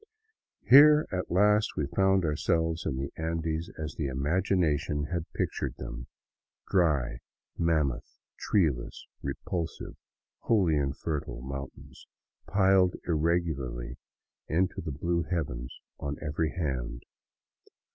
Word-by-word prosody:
Here 150 +3 +8
at 90 -1 -2
last 105 +4 +3
we 75 - +1
found 95 +3 +2
ourselves 80 +1 0
in 65 - -1
the 70 +1 -4
Andes 80 0 -2
as 75 -1 -4
the 75 - -2
imagination 75 +1 +1
had 85 -2 -3
pictured - - -2
them, - - -7 0.3
— - - -59
dry, 70 -10 +2 0.4
mammoth, 70 -6 0 0.2
treeless, 65 - 0 0.2
repulsive, 80 +5 -4 0.4
wholly 95 -8 +2
infertile 70 -3 -2
mountains 70 0 -8 0.4
piled 95 -2 +4
irregularly 75 -7 -1 0.5
into 90 +3 0
the 80 - -4
blue 85 +5 -1
heavens 70 -9 -4 0.2
on 70 0 -4
every 75 +2 -1
hand. 65 -8 -3
80 Hz, 105 wpm, -29 LUFS, 70-90 Hz, 0.5 s, Here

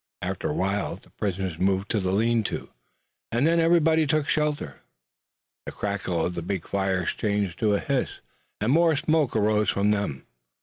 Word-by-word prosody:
After - - -2
a - - -1
while 100 +2 -1
the - - -19
prisoners 95 -4 -3
moved 95 +1 +1
to 110 - +1
the 95 -1 -1
lean 115 +3 +2
tos, - - -4 0.6
and 120 +5 +2
then 165 +1 +3
everybody 165 -2 +4
took 155 0 +1
shelter. 150 -1 -1 0.9
The - - -3
crackle 95 -5 -2
of 90 - -2
the 85 - -4
big 90 0 -4
fires 95 -2 0
changed 100 -4 -1
to 105 -2 +3
a - - +1
hiss, 140 -4 -2 0.4
and 105 +4 +1
more 165 +1 +4
smoke 155 -3 +1
arose 105 -1 +2
from 100 +1 +2
them. 100 -11 -2
105 Hz, 175 wpm, -26 LUFS, 95-145 Hz, 0.9 s, everybody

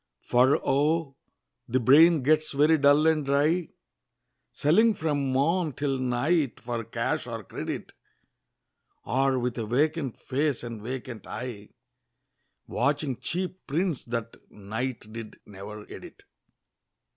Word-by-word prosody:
For 125 +3 +4
oh! 145 +1 +1 0.5
the 130 +2 +2
brain 150 +5 +6
gets 155 +2 +2
very 150 +3 +4
dull 145 +2 +5
and 160 -2 +3
dry, 150 +5 +1 0.8
Selling 215 +9 +3
from 145 -5 -1
morn 155 +4 +1
till 135 0 -2
night 130 +4 0
for 120 -1 -4
cash - - -2
or - - -5
credit; - - -6 1.1
Or 135 +3 +1
with 125 0 -2
a 110 - -3
vacant 145 +2 0
face 140 -1 -1
and 115 -3 -6
vacant 125 0 -6
eye, 115 -5 -7 1.0
Watching 140 0 0
cheap 185 +2 -3
prints 165 +1 -1
that 115 -1 -4
Knight 110 +2 -5
did 115 -2 -8
never 105 +1 -9
edit. - - -11
135 Hz, 120 wpm, -27 LUFS, 120-155 Hz, 1.1 s, brain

